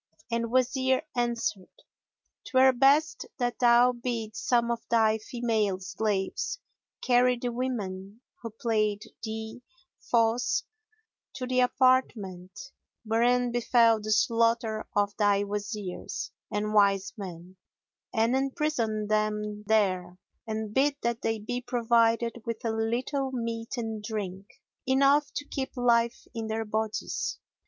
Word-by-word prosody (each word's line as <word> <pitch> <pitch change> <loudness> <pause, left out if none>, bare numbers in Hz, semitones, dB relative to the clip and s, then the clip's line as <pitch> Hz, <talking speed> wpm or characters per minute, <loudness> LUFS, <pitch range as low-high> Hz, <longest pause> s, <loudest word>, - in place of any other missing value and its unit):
and 230 0 0
the - - -4
Wazir 260 +1 +2
answered, 235 -5 -1 0.8
"'Twere 260 0 +5
best 280 +5 +3
that 245 -2 -2
thou 240 0 +6
bid 235 -3 -4
some 235 +3 +1
of 235 -1 -2
thy 220 -1 +3
female 220 -4 -1
slaves 210 - -2 0.5
carry 250 0 +4
the 245 0 -3
women 210 -5 -4 0.2
who 230 - -5
played 215 -2 -1 0.2
thee 220 +2 -5 0.5
false 230 +1 +2 0.7
to 255 - -4
the 255 0 0
apartment, 245 -5 +1 0.3
wherein 240 +2 +2
befel 235 -1 +4
the 215 - -6
slaughter 230 -1 +2
of 205 0 +1
thy 205 -1 +3
Wazirs 205 -1 -5 0.2
and 210 +1 -1
wise 200 -2 +3
men 185 -3 -9 0.5
and 230 +1 +2
imprison 265 -6 -1
them 210 0 -1
there; 185 -5 +1 0.3
and 220 -1 -4
bid 280 +3 +3
that 235 0 -1
they 225 0 0
be 245 +4 -4
provided 235 -1 +1
with 230 0 -5
a 225 - +1
little 245 +5 -1
meat 230 0 -4
and 225 -2 -4
drink, 200 -3 -5 0.4
enough 275 +2 +4
to 290 - -3
keep 270 -1 -5
life 235 -1 +2
in 225 -1 -4
their 220 0 -2
bodies. 215 0 -2
230 Hz, 125 wpm, -28 LUFS, 215-245 Hz, 0.8 s, thou